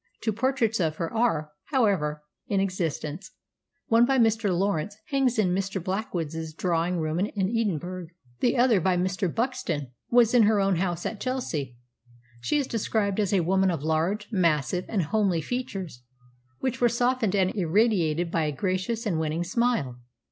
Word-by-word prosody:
Two 220 - -1
portraits 230 -1 +1
of 160 -3 0
her 165 0 -4
are, 165 -10 +1
however, 190 - +1 0.2
in 200 - +1
existence. 180 - -3 0.6
One, 230 +1 +4
by 265 +2 +3
Mr. 225 -3 +3
Lawrence, 195 +1 0
hangs 270 -4 +1
in 185 -5 +2
Mr. 190 +1 -1
Blackwood's 165 -5 -3
drawing 175 0 0
room 155 0 -1
in 200 +3 0 0.2
Edinburgh; 185 -5 -2 0.3
the 245 +1 +2
other, 240 -6 +4
by 185 +1 +2
Mr. 185 0 0
Buxton, 165 - -2 0.2
was 235 -1 +4
in 245 - +6
her 215 -2 +3
own 195 -2 +2
house 175 -1 -2
at 210 - -4
Chelsea. 160 - -3 0.6
She 125 - 0
is 285 - +1
described 215 -3 -1
as 205 -3 +1
a 195 -3 +3
woman 190 +3 +2
of 165 -5 -2
large, 165 +7 0
massive, 175 -2 +1
and 200 -6 0
homely 195 0 +1
features, 190 - -5 0.6
which 260 -1 -2
were 240 - +5
softened 235 -3 +1
and 190 -1 +2
irradiated 175 -3 +1
by 165 -2 +1
a 150 - 0
gracious 190 - -2
and 175 -7 0
winning 160 +2 -1
smile. 180 - 0
190 Hz, 160 wpm, -26 LUFS, 165-225 Hz, 0.6 s, in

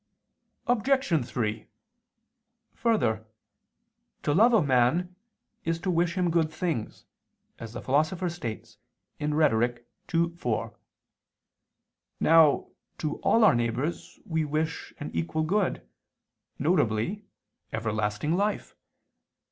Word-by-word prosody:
Obj. 245 - +2
3: 110 -3 -3 1.1
Further, 215 - +1 1.0
to 145 - +1
love 225 +9 +6
a 220 -7 +4
man 140 +7 +2 0.5
is 165 0 -1
to 185 - 0
wish 170 0 +1
him 180 -2 +2
good 160 -2 +2
things, 155 - -3 0.5
as 115 -1 -8
the 120 - -6
Philosopher 155 +7 +1
states 115 -10 -6 0.4
(Rhet. 120 -6 +1 0.3
ii, 170 +1 +3
4). 120 -10 -2 1.4
Now 160 -3 +5 0.3
to 150 -1 -3
all 230 - +3
our 215 - +7
neighbors 120 +7 -2
we 160 -2 0
wish 155 +2 -2
an - - -5
equal 85 - -1
good, 185 - 0 0.7
viz. 145 - +1 0.5
everlasting 110 +6 -1
life. 205 +3 -1
155 Hz, 100 wpm, -27 LUFS, 120-175 Hz, 1.4 s, our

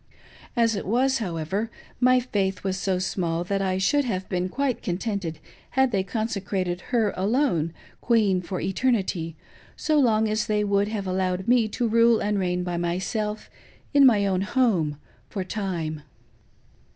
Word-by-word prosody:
As 230 -2 +3
it 200 - -4
was, 260 +5 +2
however, 190 +2 -2 0.3
my 255 0 +5
faith 195 -6 -1
was 190 -1 -1
so 190 -1 0
small 175 -2 -1
that 195 +2 -1
I 185 -1 0
should 285 +10 +2
have 190 -7 -3
been 180 0 -1
quite 265 +2 -1
contented 180 -3 -3 0.4
had 265 -1 +4
they 195 -3 +1
consecrated 195 -3 -2
her 225 -5 +2
alone 195 - +1 0.3
queen 210 -6 +3
for 185 +1 -4
Eternity, 190 -5 0 0.4
so 305 -1 +1
long 220 -4 +3
as 215 0 0
they 210 -1 +1
would 200 0 +2
have 210 -2 -3
allowed 185 0 -1
me 240 -2 +4
to 235 +3 -1
rule 230 0 +4
and 205 0 0
reign 180 -1 0
by 175 -1 -2
myself 195 +5 -2 0.5
in 285 -1 +6
my 210 -5 +4
own 190 -2 +1
home 195 - +1 0.3
for 195 - -3
Time. 175 -6 -3
200 Hz, 155 wpm, -25 LUFS, 185-230 Hz, 0.5 s, in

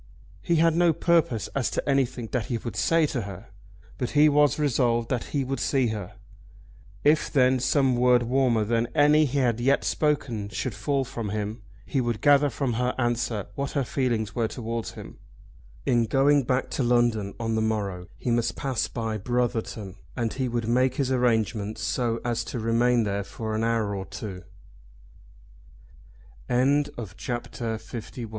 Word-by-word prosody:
He 170 - +1
had 165 0 +4
no 170 -1 +4
purpose 160 -10 +1
as 135 -3 -1
to - - -3
anything 130 -4 0
that 120 -5 -1
he 120 - -1
would 115 0 -6
say 165 -1 +3
to 135 -4 -2
her, 100 +1 -9 0.5
but 125 - -1
he 150 +1 +7
was 145 0 +3
resolved 120 -5 +1
that 125 -3 -1
he 140 -2 -1
would 135 +1 -3
see 130 -4 +1
her. 105 -4 -5 0.9
If 150 +1 +3
then 130 -1 +4
some 130 0 +2
word 125 0 +4
warmer 120 -3 +2
than 115 +2 +1
any 150 +1 +5
he 140 0 -2
had 120 -4 +1
yet 135 +3 +2
spoken 125 -9 -1
should 110 +4 -3
fall 135 +6 -1
from 115 -4 -5
him, 105 +2 -3 0.2
he 135 - 0
would 120 -3 -1
gather 145 0 +5
from 130 0 -2
her 125 0 0
answer 120 -4 -1
what 140 0 -4
her 140 - +1
feelings 115 -5 -1
were 115 -1 0
towards 115 -1 -4
him. - - -11 0.7
In 120 -1 +3
going 135 +3 +3
back 130 +1 0
to - - -1
London 120 -4 +1
on 115 -1 -1
the 110 - +1
morrow 100 -5 -2
he 125 - -2
must 115 0 +1
pass 130 -4 -1
by 115 -2 -3
Brotherton, 110 -4 -2 0.2
and 115 -2 -1
he 130 -1 -1
would 120 -2 -2
make 130 +2 +2
his 135 -2 0
arrangements 110 -4 0
so 115 0 0
as 120 -1 0
to - - -5
remain 115 +1 +2
there 100 -1 -1
for 110 +2 -5
an 110 +1 -1
hour 115 -3 0
or 95 -1 -4
two. 95 -4 -7 2.1
CHAPTER 120 -3 -1
LII. - - -3
ANOTHER 115 +2 -8
LOVER. 115 - -7
120 Hz, 175 wpm, -26 LUFS, 110-135 Hz, 2.1 s, he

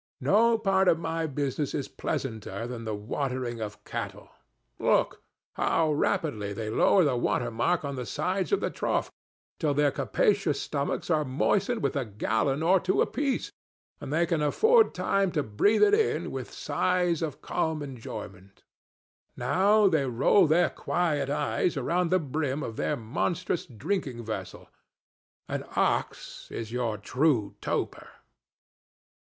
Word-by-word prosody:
No 230 +2 +4
part 195 -3 +2
of 165 - +5
my 165 0 -2
business 145 0 -2
is 140 - -2
pleasanter 110 -4 -4
than 120 -1 -6
the 110 -1 -2
watering 125 +2 -3
of 105 -1 -6
cattle. - - -6 0.5
Look! - - +2 0.3
how 160 -2 +1
rapidly 110 -9 -1
they 110 +1 -4
lower 185 - +4
the 140 -5 +2
water 120 - 0
mark 150 +9 0
on 140 -1 -4
the 125 -2 -4
sides 180 - -1
of 400 - +2
the - - -1
trough, - - -1 0.5
till 150 -3 +1
their 145 0 +3
capacious 195 -7 +1
stomachs 140 +4 -2
are 155 -1 +3
moistened 195 - 0
with - - 0
a 140 - 0
gallon 115 +6 -1
or 185 +3 +5
two 185 +1 0
apiece 280 -2 0 0.5
and - - -7
they 165 +3 +2
can 165 -2 0
afford 445 - +4
time 195 -2 +1
to 150 -4 +1
breathe 170 - +3
it 415 0 +5
in 435 +1 +1
with - - -6
sighs 180 -3 0
of 155 -4 -4
calm 160 -2 -1
enjoyment. 100 -7 -9 0.7
Now 200 - +4
they 155 -7 +2
roll 135 - +4
their 170 +3 +3
quiet 150 -6 -1
eyes 150 +3 0
around 170 +6 0
the 185 - +4
brim 150 -2 -2
of 115 - -5
their 150 - -1
monstrous 170 +10 -2
drinking 130 - -3
vessel. 110 - -6 0.8
An - - -3
ox - - -1
is 115 -1 -6
your 120 -3 -1
true 120 -2 +1
toper. - - -3
150 Hz, 145 wpm, -28 LUFS, 120-180 Hz, 0.8 s, of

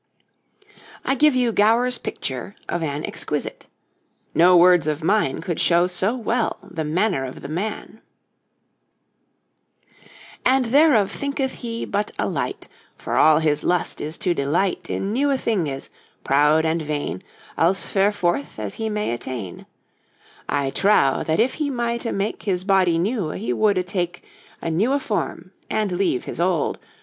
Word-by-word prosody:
I - - +2
give 295 +1 +4
you 245 -2 +2
Gower's 230 +4 +3
picture 130 +9 -5
of 175 - -2
an 150 -1 -2
exquisite; - - -4 0.7
no 180 +2 +6
words 175 -2 +5
of 155 +1 -2
mine 185 -7 +1
could 170 -1 -3
show 170 0 +4
so 185 +5 0
well 235 -1 -1
the 165 -5 -5
manner 170 0 0
of 130 -1 -7
the - - -7
man: 205 +7 -5 2.4
'And 260 0 +3
therof 255 -5 +4
thenketh 280 -2 -2
he 230 -2 -4
but 205 +1 -2
a - - 0
lite, - - -3 0.3
For - - -4
all 155 -1 +6
his 150 -2 +1
lust 180 -1 0
is 155 +2 -4
to 180 - 0
delite 170 +6 -1
In 195 +2 -2
newé 280 +3 +2
thingés, 165 - -2 0.3
proude 150 +3 +3
and 160 +1 0
veine, 145 - -3 0.3
Als 180 +4 +2
ferforth 195 -7 0
as 105 -2 -4
he 220 0 -3
may 210 - -1
atteine. 120 -6 -7 0.8
I 140 -1 0
trowe, 195 -9 +3
if - - -5
that 160 0 +1
he 275 +5 +1
mighté 235 -2 -2
make 200 +2 -2
His 185 -3 -1
body 190 -4 +3
newe, 195 -1 -1
he 215 - -2
woldé 200 -4 +2
take 180 -1 -3 0.4
A - - -1
newé 220 - +1
form 205 -6 -3 0.2
and 215 -3 0
leve 180 -8 0
his - - -7
olde. 175 -3 0
185 Hz, 150 wpm, -22 LUFS, 160-220 Hz, 2.4 s, no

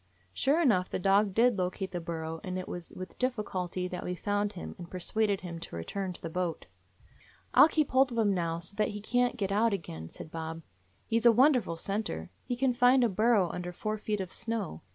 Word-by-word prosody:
Sure 285 +5 +2
enough, 210 - +3
the - - -2
dog 195 +2 +3
did 230 +1 +3
locate 185 +1 -2
the 175 - -3
burrow; 165 -1 -5
and 185 0 -3
it 185 - -5
was 175 -1 -6
with 185 0 -8
difficulty 190 -7 -2
that 180 0 -5
we 180 - -3
found 205 +2 -1
him, 180 - -7
and 175 -1 -8
persuaded 200 +2 0
him 170 -2 -6
to 165 - -8
return 185 - -3
to 175 - -10
the - - -2
boat. 175 0 -3 0.9
"I - - +7
'll - - +10
keep 310 -2 0
hold 265 0 +4
of 235 - -4
him 210 -3 +3
now, 165 -2 -1
so 170 +3 -5
that 215 - +2
he - - -5
can't 245 +4 +1
get 200 -3 -1
out 220 +2 +3
again," 80 - -5
said 155 - -10
Bob. 160 0 -5 0.4
"He 230 0 +1
's 230 - -8
a - - +9
wonder 255 +3 +5
ful 165 -5 -5
scenter. 180 - -2
He 245 - -2
can 255 +1 +2
find 250 +1 +5
a 235 - +3
burrow 210 -2 +3
under 180 0 -5
four 215 +4 -3
feet 210 -1 -2
of 185 -1 -6
snow. 225 - -4
195 Hz, 230 wpm, -30 LUFS, 175-230 Hz, 0.9 s, ll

